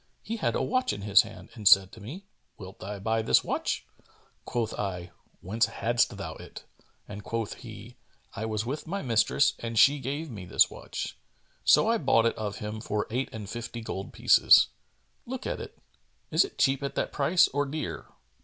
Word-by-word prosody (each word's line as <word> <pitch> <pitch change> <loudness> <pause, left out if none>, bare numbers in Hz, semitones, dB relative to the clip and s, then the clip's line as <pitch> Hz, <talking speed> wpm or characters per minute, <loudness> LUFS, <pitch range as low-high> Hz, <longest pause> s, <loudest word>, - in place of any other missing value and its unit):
He 230 +2 -4
had - - 0
a - - 0
watch 255 +2 0
in 100 -1 -7
his 100 0 +6
hand 110 -2 -11
and 110 -5 -2
said 95 0 +7
to 110 - -13
me, 155 - -9 0.3
'Wilt 95 -1 -11
thou 100 +2 -6
buy 110 +3 0
this 110 - +3
watch?' - - -2 0.6
Quoth 115 -2 -2
I, 90 -4 -4 0.3
'Whence 110 +5 +1
hadst 120 +1 0
thou - - -5
it?'; - - -11 0.4
and 105 0 -8
quoth 115 -2 -3
he, - - -11 0.4
'I 110 - -4
was 110 0 -2
with 140 +6 -4
my 195 +4 -3
mistress 125 +3 +3
and 115 -1 -5
she 140 +5 +6
gave 140 +4 -4
me 100 -5 -8
this - - +3
watch.' - - -6 0.4
So - - +5
I 230 0 +2
bought 115 - +3
it 115 - +1
of 105 -2 -4
him 105 +1 -5
for 105 -2 -2
eight 130 +3 -1
and 105 -2 -7
fifty 120 +2 -6
gold 95 -3 -6
pieces. - - +6 0.6
Look 260 +1 -5
at - - -3
it: - - -10 0.5
is - - +5
it 395 - -9
cheap 135 +1 +2
at 140 - -4
that - - -1
price 165 +5 +4
or 145 +1 -1
dear?' 135 - -5
115 Hz, 190 wpm, -28 LUFS, 105-140 Hz, 0.6 s, said